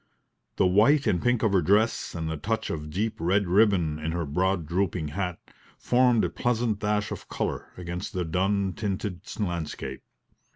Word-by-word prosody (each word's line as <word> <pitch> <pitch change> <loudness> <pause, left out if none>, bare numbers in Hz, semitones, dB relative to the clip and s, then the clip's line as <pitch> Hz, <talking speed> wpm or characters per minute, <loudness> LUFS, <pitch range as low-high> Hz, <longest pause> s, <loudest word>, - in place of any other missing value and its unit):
The - - +3
white 110 +11 +4
and 95 -7 +1
pink 120 -1 +1
of 110 -3 +2
her 95 - +4
dress, 105 +6 +2
and 80 -1 -3
the 80 - -2
touch 110 +7 -2
of 75 -1 -5
deep 105 +8 -2
red 95 +5 +2
ribbon 90 -5 +3
in 80 +1 -3
her 85 -1 -1
broad 90 +4 0
drooping 85 -1 -1
hat, 90 +1 -3 0.4
formed 125 -2 +3
a - - -1
pleasant 120 -3 0
dash 105 -1 0
of - - -7
colour - - -3
against 90 +1 -5
the 90 -2 -1
dun 95 +3 0
tinted 95 -2 -3 0.2
landscape. 85 -8 -3
95 Hz, 170 wpm, -27 LUFS, 85-105 Hz, 0.4 s, white